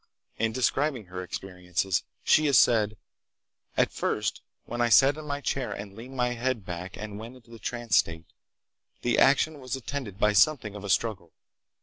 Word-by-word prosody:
In 115 0 +1
describing 130 0 0
her 90 0 -6
experiences 90 0 -2 0.2
she 155 0 +4
has 140 -4 +5
said: 110 -3 +4 0.8
"At - - +3
first - - -2 0.2
when 120 +1 -3
I 120 - +3
sat 135 +4 +6
in 155 0 -8
my 145 0 -3
chair 135 -1 -2
and 100 -1 -7
leaned 125 +4 -10
my 125 0 +2
head 120 -3 -2
back 90 +1 -6
and 105 -1 -7
went 115 +3 -9
into 120 -2 -18
the 115 - -11
trance 120 -5 0
state, 80 0 0 0.8
the 120 -1 +2
action 150 +2 +4
was 130 0 -4
attended 130 -6 -5
by 105 +1 +3
something 105 - +3
of 105 -1 -8
a 100 - -5
struggle. 100 -6 0
115 Hz, 180 wpm, -27 LUFS, 100-130 Hz, 0.8 s, sat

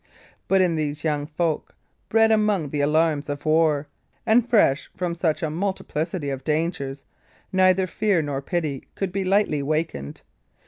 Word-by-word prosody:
But 195 0 +4
in 170 -3 +1
these 150 -1 -3
young 150 -2 -1
folk, 160 0 -2 0.3
bred 225 0 +4
among 210 -8 +2
the 145 - -1
alarms 150 0 +1
of 145 +1 -5
war, 155 -2 +2 0.4
and 230 +2 +3
fresh 165 - +3
from 175 -1 -1
such 170 -1 -1
a 155 - -1
multiplicity 165 -3 -3
of 135 -1 -5
dangers, 145 -3 -2 0.5
neither 185 0 +4
fear 195 -2 +1
nor 140 -2 -3
pity 150 -3 -3
could 195 -2 -2
be 195 +1 -1
lightly 190 -6 +2
wakened. 145 - -3
160 Hz, 150 wpm, -24 LUFS, 145-185 Hz, 0.5 s, But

